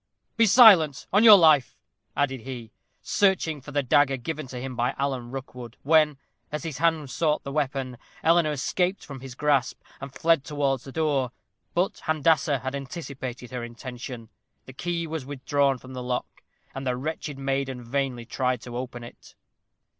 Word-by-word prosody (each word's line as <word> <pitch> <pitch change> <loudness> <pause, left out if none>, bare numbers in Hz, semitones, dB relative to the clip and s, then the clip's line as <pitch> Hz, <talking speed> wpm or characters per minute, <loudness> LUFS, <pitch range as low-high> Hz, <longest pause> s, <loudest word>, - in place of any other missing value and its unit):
"Be 230 -1 +4
silent, 185 - +7
on 205 +3 +5
your 215 -3 +11
life," 155 -6 +4 0.4
added 135 -3 0
he, 120 -3 -8 0.3
searching 185 -7 +1
for 145 - -10
the 145 -1 0
dagger 135 +1 +3
given 155 +3 -5
to 125 -1 -7
him 130 0 -6
by 120 +2 0
Alan 130 -3 -2
Rookwood, 125 -2 -8
when, 155 -1 +4 0.3
as 150 - -4
his 155 -5 -5
hand 160 -4 +1
sought 150 +4 0
the 140 - -6
weapon, 135 -3 -2 0.3
Eleanor 165 -1 +4
escaped 180 +6 -1
from 140 -2 -8
his 130 -1 -9
grasp, 140 -2 +1 0.2
and 135 0 -7
fled 165 0 +2
towards 140 -4 -1
the 135 - -8
door. 140 -5 0 0.4
But 180 +3 0
Handassah 155 -2 +2
had 130 0 -3
anticipated 135 -4 -6
her 125 -2 -4
intention. 120 -1 -8 0.4
The 130 - -11
key 170 +4 -3
was 160 -2 -4
withdrawn 140 0 0
from 130 +1 -12
the 125 - -5
lock, 125 0 -4 0.3
and 135 0 -5
the 125 -1 0
wretched 150 +1 -5
maiden 135 -2 -2
vainly 125 -1 -2
tried 125 +1 -1
to 120 -1 -9
open 125 -1 -5
it. 120 - -14
135 Hz, 170 wpm, -26 LUFS, 125-155 Hz, 0.4 s, your